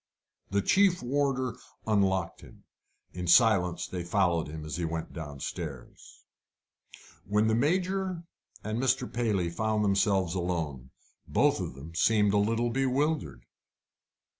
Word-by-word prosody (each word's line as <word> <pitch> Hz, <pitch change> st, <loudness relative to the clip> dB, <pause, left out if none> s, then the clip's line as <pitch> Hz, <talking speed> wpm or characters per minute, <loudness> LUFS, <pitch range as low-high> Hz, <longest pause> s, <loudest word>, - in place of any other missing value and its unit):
The 100 Hz, 0 st, 0 dB
chief 190 Hz, -, +3 dB
warder 130 Hz, -1 st, 0 dB, 0.3 s
unlocked 95 Hz, -4 st, +1 dB
him. -, -, -16 dB, 0.5 s
In 90 Hz, 0 st, -5 dB
silence 90 Hz, -4 st, +4 dB
they 90 Hz, -2 st, -5 dB
followed 85 Hz, -3 st, +1 dB
him 75 Hz, 0 st, -7 dB
as 75 Hz, +1 st, -5 dB
he 90 Hz, -, -2 dB
went 80 Hz, 0 st, -4 dB
downstairs. 75 Hz, -2 st, -8 dB, 1.0 s
When 105 Hz, +2 st, +2 dB
the 110 Hz, -, +2 dB
Major 180 Hz, +7 st, 0 dB, 0.4 s
and 110 Hz, +3 st, -2 dB
Mr. 130 Hz, -1 st, +1 dB
Paley 105 Hz, -8 st, 0 dB
found 110 Hz, +3 st, 0 dB
themselves 100 Hz, -3 st, +2 dB
alone, 80 Hz, -8 st, -3 dB, 0.4 s
both -, -, +2 dB
of -, -, -5 dB
them 75 Hz, +5 st, -10 dB
seemed 105 Hz, +3 st, +3 dB
a -, -, +3 dB
little 115 Hz, +3 st, +1 dB
bewildered. 135 Hz, -, -1 dB
100 Hz, 125 wpm, -29 LUFS, 85-125 Hz, 1.0 s, silence